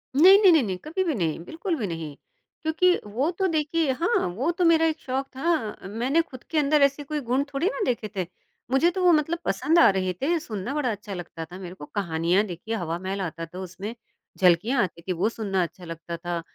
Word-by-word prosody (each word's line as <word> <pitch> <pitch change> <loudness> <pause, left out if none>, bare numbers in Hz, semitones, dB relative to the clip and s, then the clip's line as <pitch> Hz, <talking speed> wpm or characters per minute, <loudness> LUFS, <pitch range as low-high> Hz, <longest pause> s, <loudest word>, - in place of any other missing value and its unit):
नहीं, 370 +7 +9
नहीं, 385 -3 +8
नहीं, 320 -5 +5
नहीं, 190 -4 -2
कभी 350 +5 -1
भी 335 -4 0
नहीं, 165 -7 -1
बिल्कुल 335 - -3
भी 220 -7 -2
नहीं। 165 -4 -5 0.5
क्योंकि 360 +3 +3
वो 240 +9 -1
तो, 380 +2 0
देखिए, 315 -2 +1
हाँ, 350 - +1
वो 225 - -2
तो 345 +1 0
मेरा 325 -1 +5
एक 320 -1 0
शौक 270 -1 -3
था 270 - -1
मैंने 245 +10 +1
खुद 255 -6 -11
के 320 - 0
अंदर 300 0 +3
ऐसे 280 +1 +2
कोई 300 +1 -3
गुण 260 +3 +2
थोड़ी 275 +6 +1
ना 440 - -2
देखे 235 -3 -1
थे। 185 -2 -1 0.5
मुझे 270 +6 +4
तो 370 +1 -2
वो 355 - +6
मतलब 320 +2 +2
पसंद 295 - +2
आ - - +8
रहे 185 -2 0
थे, 330 +5 +1
सुनना 220 -4 -5
बड़ा 290 -5 0
अच्छा 205 -1 -6
लगता 175 -2 -6
था 180 +3 -11
मेरे 180 -1 -8
को। 145 - -9
कहानियाँ, 170 +1 +1
देखिए, 195 +4 -5
हवामहल 185 +2 -3
आता 165 -2 -4
था 175 +3 -10
उसमें, 190 +4 -6 0.4
झलकियाँ 195 +8 +3
आती 170 -2 -5
थी, 185 +2 -2
वो 185 +5 +1
सुनना 200 -5 -1
अच्छा 175 +1 -8
लगता 165 0 -6
था। 175 0 -3
235 Hz, 220 wpm, -25 LUFS, -, 0.5 s, नहीं